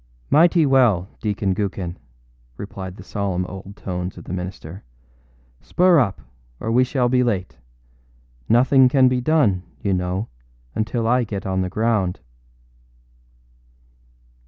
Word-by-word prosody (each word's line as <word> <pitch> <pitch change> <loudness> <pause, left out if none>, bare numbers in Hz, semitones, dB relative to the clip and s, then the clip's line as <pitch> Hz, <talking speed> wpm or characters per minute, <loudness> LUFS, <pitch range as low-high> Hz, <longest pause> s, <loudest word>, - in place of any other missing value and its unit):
â - - -11
âMighty 165 +1 +5
well, 120 -10 +3
Deacon 100 -2 -1
Gookin!â 95 -3 -3 0.6
replied 95 -2 -7
the 95 - -11
solemn 95 -2 -2
old 95 +2 -9
tones 90 -1 -5
of - - -9
the - - -7
minister. 90 0 -7 0.8
âSpur 170 - +4
up, 95 -5 -5 0.4
or 110 - -3
we 125 +2 +4
shall 130 -1 0
be 125 +1 +2
late. 100 -7 -2 0.9
Nothing 130 +2 +5
can 130 0 +4
be 125 0 +1
done, 125 - +2 0.2
you 100 -2 +1
know, 90 +3 -2 0.5
until 115 +1 -1
I 125 +1 +3
get 100 -3 -5
on 95 -1 -1
the 90 - -2
ground. 105 -3 0
100 Hz, 135 wpm, -21 LUFS, 95-125 Hz, 0.9 s, âMighty